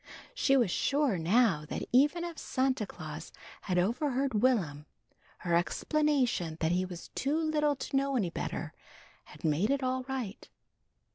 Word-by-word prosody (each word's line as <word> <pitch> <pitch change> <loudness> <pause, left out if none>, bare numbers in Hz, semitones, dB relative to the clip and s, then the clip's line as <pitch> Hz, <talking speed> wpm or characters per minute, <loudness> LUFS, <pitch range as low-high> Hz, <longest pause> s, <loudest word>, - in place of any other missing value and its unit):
She 275 - +3
was 235 -8 +2
sure 275 - +1
now 185 -2 +3
that - - -3
even 290 +7 +4
if 340 -2 -6
Santa 260 -5 0
Claus - - -8 0.3
had 180 -3 -1
overheard 255 - +1
Will'm, 170 - +1 0.5
her 175 - -2
explanation 245 - +1
that 160 0 +1
he 180 +1 +1
was 175 -2 -9
too 285 +3 0
little 305 -2 +1
to 270 - -5
know 275 0 +1
any 195 -9 0
better - - -4 0.5
had - - -15
made 160 +8 +2
it 280 -1 +1
all 255 0 0
right. 255 -6 -5
255 Hz, 150 wpm, -31 LUFS, 180-280 Hz, 0.5 s, even